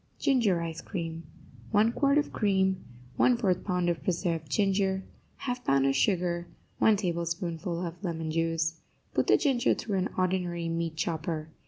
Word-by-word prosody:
GINGER 230 -10 +2
ICE 165 -1 -4
CREAM 165 -3 -5 0.5
1 215 - +4
quart 280 +3 +2
of 295 - 0
cream 190 -3 +1 0.4
1/4 230 -7 +3
pound 180 -2 0
of 170 -1 -1
preserved 165 -4 -1
ginger 195 +1 +1 0.4
1/2 250 -1 -3
pound 135 - +3
of 135 0 +2
sugar 175 +2 +1 0.3
1 220 - +5
tablespoonful 170 -1 -2
of 170 +3 -7
lemon 165 -3 -2
juice 165 0 0 0.3
Put - - +1
the - - +6
ginger 265 -5 +2
through 200 -4 -2
an 185 - 0
ordinary 180 -2 0
meat 165 -1 -2
chopper. 160 -1 -2
175 Hz, 150 wpm, -29 LUFS, 165-195 Hz, 0.5 s, the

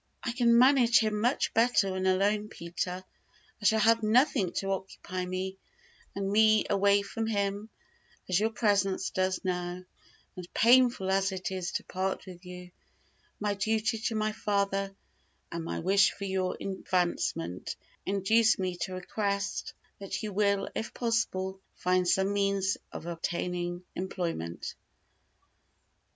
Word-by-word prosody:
"I 240 - -1
can 235 -1 +4
manage 250 -2 +6
him 215 -2 +1
much 245 +4 +1
better 225 -4 +3
when 185 0 -1
alone, 205 +3 +2
Peter; 180 +1 -4 0.6
I - - -6
shall 220 +1 +4
have 230 +1 +4
nothing 220 - +3
to 195 0 -2
occupy 190 -1 -4
me, 190 +1 -4 0.6
and 200 - -2
take 195 - -1
me 215 +1 +5
away 200 0 +4
from 220 +3 -3
him, 205 0 -1 0.6
as 185 0 +2
your 220 +2 +2
presence 200 -4 +1
does 185 0 0
now; 180 0 -2 0.5
and, 180 -1 -9
painful 240 -5 +5
as 195 0 +2
it 190 0 -4
is 185 -2 -3
to - - -2
part 190 +1 -3
with 180 -1 -11
you, 180 0 -9 0.7
my 210 -1 0
duty 220 +2 0
to 225 +1 -2
my 215 0 0
father, 195 -2 -1 0.6
and 170 -1 -4
my 165 - -4
wish 195 +3 +4
for 200 - -7
your 190 -1 -1
advancement, 175 - -2 0.3
induce 215 +4 +3
me 185 -2 -2
to 185 +1 -4
request 200 +2 -2 0.2
that 200 +2 -5
you 210 -2 -4
will, 200 0 +1
if 225 - -5
possible, 195 -5 -1
find 180 0 +1
some 190 +3 +2
means 200 -1 +1 0.2
of - - -7
obtaining 175 +1 -3
employment." 170 - -4
195 Hz, 140 wpm, -29 LUFS, 185-215 Hz, 0.7 s, manage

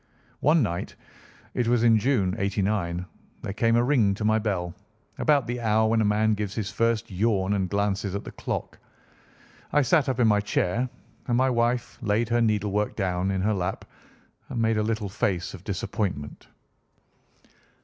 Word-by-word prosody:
One 150 +1 +4
night—it 105 +5 -6
was 120 -1 +3
in 115 -2 +5
June, 105 -6 +1
'89—there 100 -3 -3
came 115 +2 +2
a 120 - +4
ring 120 -7 +3
to 105 - -4
my 110 +1 +3
bell, 95 -5 -2 0.5
about 145 -4 +3
the 120 +1 -4
hour 110 0 +3
when 115 0 +3
a - - +2
man 105 +1 +2
gives 105 -1 -3
his 105 -3 -3
first 115 0 0
yawn 100 0 +1
and 95 -2 0
glances 100 0 -1
at 100 - -3
the - - -8
clock. - - -5 0.9
I 145 0 +4
sat 150 +1 +3
up 130 -1 -1
in 120 - +5
my 105 -1 +4
chair, 105 +4 0 0.4
and 120 -2 +2
my 130 +1 +3
wife 120 0 0
laid 110 +1 0
her 120 0 +2
needle 105 -3 +1
work 105 +1 -1
down 95 -2 -1
in 95 -1 0
her 105 +3 +1
lap 95 -1 -3 0.6
and 125 - -3
made 110 -1 +2
a - - +1
little 110 -1 -1
face 95 -2 -1
of - - -10
disappointment. 75 -9 -4
105 Hz, 170 wpm, -26 LUFS, 100-115 Hz, 0.9 s, in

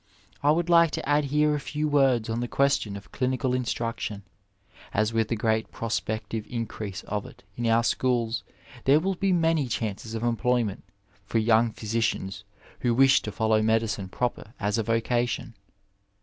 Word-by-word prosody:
I 145 - +3
would 165 +3 +2
like 170 -1 +6
to - - -3
add 145 0 +3
here 150 +2 +2
a 150 - 0
few 150 +2 -2
words 135 -6 +3
on 115 +1 -2
the 120 - -2
question 135 -7 +1
of 100 - -13
clinical 130 -1 0
instruction, 115 -4 -2 0.7
as 110 +2 +1
with 115 -1 +1
the 115 - -1
great 110 0 0
prospective 110 -1 -3
increase 110 -4 -5
of 105 -1 -4
it - - -16
in 120 -1 -2
our 115 +1 +4
schools 120 -1 0 0.4
there 140 +3 +6
will 190 +4 0
be 195 +1 0
many 165 -5 +2
chances 110 -1 -3
of 110 - -3
employ 120 +1 +2
ment 100 -3 -5 0.4
for 110 - -2
young 115 +1 +4
physicians 105 -3 -2 0.4
who 120 -2 +1
wish 135 +1 +5
to - - -5
follow 110 -1 +2
medicine 110 -3 0
proper 120 +1 -3
as 105 +1 0
a - - +3
vocation. 120 +2 -1
115 Hz, 170 wpm, -26 LUFS, 110-135 Hz, 0.7 s, like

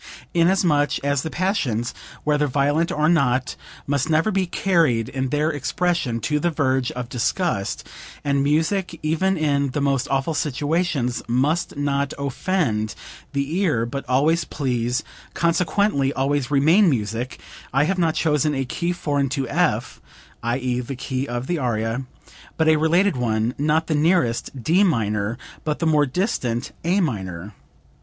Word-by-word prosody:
"Inasmuch 170 -5 +3
as 140 -1 +1
the 160 - -4
passions, 140 - -1 0.3
whether 150 -1 +2
violent 145 +5 +1
or 150 +1 +1
not, 130 -6 +2 0.3
must 140 0 0
never 160 +7 +2
be 190 -2 0
carried 165 - +2
in 130 0 -2
their 150 +3 +1
expression 145 -3 -1
to 150 +5 0
the 175 - +1
verge 130 -5 +1
of 125 -1 -5
disgust, 120 - -1 0.4
and 140 -1 +1
music, 165 +5 0
even 180 +5 +1
in 140 -3 +1
the 140 - -2
most 140 -2 +1
awful 135 +4 0
situations 145 -3 -1
must 140 +8 0
not 140 -1 -1
offend 140 - -1 0.4
the 140 +5 -1
ear 150 - +1
but 135 +4 -4
always 155 +6 +3
please, 125 -5 -1 0.3
consequently 170 -3 +1
always 135 0 0
remain 160 +8 +5
music, 115 -1 -2 0.3
I 135 +2 +3
have 185 +4 0
not 165 -2 +2
chosen 150 -2 +1
a 135 0 -1
key 170 +7 -2
foreign 145 -5 -1
to 135 -1 -2
F - - 0 0.4
(i.e. 125 +1 -1
the 125 +2 -5
key 130 +2 -3
of 120 0 -3
the 175 +3 -1
aria), 120 0 -1 0.5
but 160 - +2
a 160 - +6
related 170 +4 +3
one, 115 -1 0
not 155 +2 +2
the 160 - -1
nearest, 145 -6 +1
D 175 - +4
minor, 110 - 0 0.3
but 150 -1 -1
the 165 - -2
more 150 -2 +3
distant, 130 - -1
A 180 +5 +2
minor. 95 - -3
145 Hz, 150 wpm, -22 LUFS, 125-165 Hz, 0.5 s, a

